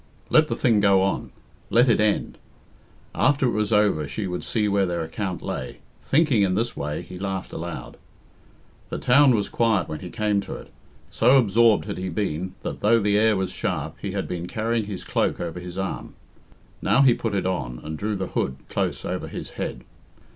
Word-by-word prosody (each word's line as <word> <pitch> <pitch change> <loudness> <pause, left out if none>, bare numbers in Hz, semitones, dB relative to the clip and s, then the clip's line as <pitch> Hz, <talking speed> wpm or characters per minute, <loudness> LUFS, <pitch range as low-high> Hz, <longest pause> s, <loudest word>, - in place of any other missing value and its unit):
Let 155 0 +6
the - - -2
thing 115 -6 +3
go 100 -2 +4
on; 95 - -1 0.4
let 120 +3 +5
it 115 - +4
end. 105 -1 0 0.7
After 135 +4 +2
it 125 - +2
was 105 -1 -1
over 100 -8 +3
she 70 +9 -4
would 90 -1 -4
see 110 -2 0
where 100 -1 +2
their 85 -1 -2
account 90 +3 -4
lay. - - -5 0.3
Thinking 140 -6 +3
in 95 -2 +2
this 115 +3 -1
way, 75 +1 -3
he 90 0 -10
laughed 95 -1 -4
aloud. 80 -7 -6 0.9
The - - -3
town 130 0 +5
was 105 -2 0
quiet 110 -5 +1
when 75 - -5
he 90 - -8
came 105 -2 0
to - - -7
it. - - -11 0.4
So 125 +4 +5
absorbed 115 -2 +4
had 100 -2 -5
he 95 0 -3
been 90 0 -3
that, - - -4
though 115 +3 +4
the 105 -1 +1
air 110 0 +4
was 95 -1 -2
sharp, - - -3
he - - -4
had - - -2
been 90 -1 -4
carrying 115 +1 -1
his 100 -3 -6
cloak - - 0
over 85 0 -4
his 90 0 -8
arm. 95 0 -4 0.7
Now 135 - +4
he 130 -3 +6
put 115 -3 -2
it 95 -2 0
on, 65 -10 -2
and 80 +1 -5
drew 105 +6 -2
the 95 -1 -2
hood 65 - -1
close - - -2
over - - -3
his - - -7
head. - - -5
100 Hz, 200 wpm, -24 LUFS, 90-115 Hz, 0.9 s, Let